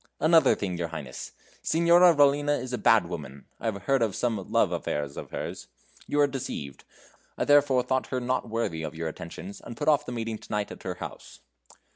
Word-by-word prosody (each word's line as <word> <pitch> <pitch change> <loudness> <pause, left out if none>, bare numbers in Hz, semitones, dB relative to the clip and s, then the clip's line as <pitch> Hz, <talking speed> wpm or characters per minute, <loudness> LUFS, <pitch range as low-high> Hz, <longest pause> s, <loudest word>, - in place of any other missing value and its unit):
"Another 160 +1 +5
thing, 90 -4 -3
your 85 - -1
Highness. 75 -6 -7 0.3
Signora 170 +1 +5
Rollina 145 0 +4
is 130 0 -6
a 125 - -1
bad 110 -1 +5
woman. 70 -6 -7
I - - -8
have 100 -4 -3
heard 135 -2 +2
of 110 -5 +1
some 110 -6 -2
love - - +3
affairs 75 -1 -3
of - - -7
hers. - - -6 0.4
You 145 - 0
are - - +7
deceived 130 - -5 0.5
I - - 0
therefore 145 -3 +4
thought 130 +1 0
her 130 - -2
not 125 -1 -1
worthy 110 -8 -2
of 80 0 -5
your 80 0 -3
attentions, 85 +4 -8
and 120 - -9
put 150 - -3
off 150 -1 +3
the - - -4
meeting 115 -2 -3
to - - -15
night 105 -1 -1
at - - -9
her 90 -1 -4
house." - - -9
115 Hz, 205 wpm, -27 LUFS, 90-140 Hz, 0.5 s, are